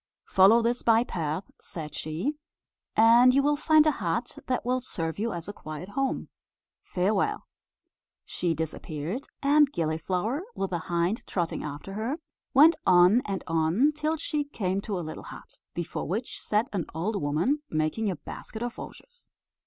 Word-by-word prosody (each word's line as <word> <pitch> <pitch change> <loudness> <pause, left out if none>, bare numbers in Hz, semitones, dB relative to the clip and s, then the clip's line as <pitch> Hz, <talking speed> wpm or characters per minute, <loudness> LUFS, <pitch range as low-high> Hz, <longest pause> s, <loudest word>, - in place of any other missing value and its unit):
"Follow 205 +5 +5
this 240 +1 0
by 230 0 +4
path," 165 -4 -4
said 155 -3 -8
she, 160 - -2 0.6
"and 235 +3 +7
you 275 - +4
will 295 +1 +3
find 310 +1 +4
a 310 - +5
hut 230 - -3
that 255 -2 -1
will 255 +1 +1
serve 165 -7 -4
you 230 +2 0
as 170 -1 -6
a 205 - -5
quiet 155 +1 -8
home. 270 +4 -1 0.5
Farewell." 195 +3 0 0.8
She 170 -2 -1
disappeared, 160 - -4 0.2
and 290 0 +5
Gilliflower, 180 - -1
with 195 - -2
the 175 - -1
hind 175 +5 0
trotting 170 -3 -2
after 150 +6 -6
her, 225 +8 -2 0.3
went 310 +4 +7
on 180 +6 +6
and 195 -2 -3
on, 165 - +2
till 305 +1 -1
she 300 -1 -1
came 195 -9 -2
to 200 -1 -3
a 175 - -4
little 155 - -7
hut, - - -12 0.2
before 170 -1 -4
which 215 +8 -3
sat 215 +4 +1
an 180 -6 -2
old 200 +5 -1
woman, 170 - +1
making 155 +8 0
a 185 - -1
basket 220 +8 -8
of 240 -1 -5
osiers. 485 -1 -11
205 Hz, 160 wpm, -27 LUFS, 170-255 Hz, 0.8 s, and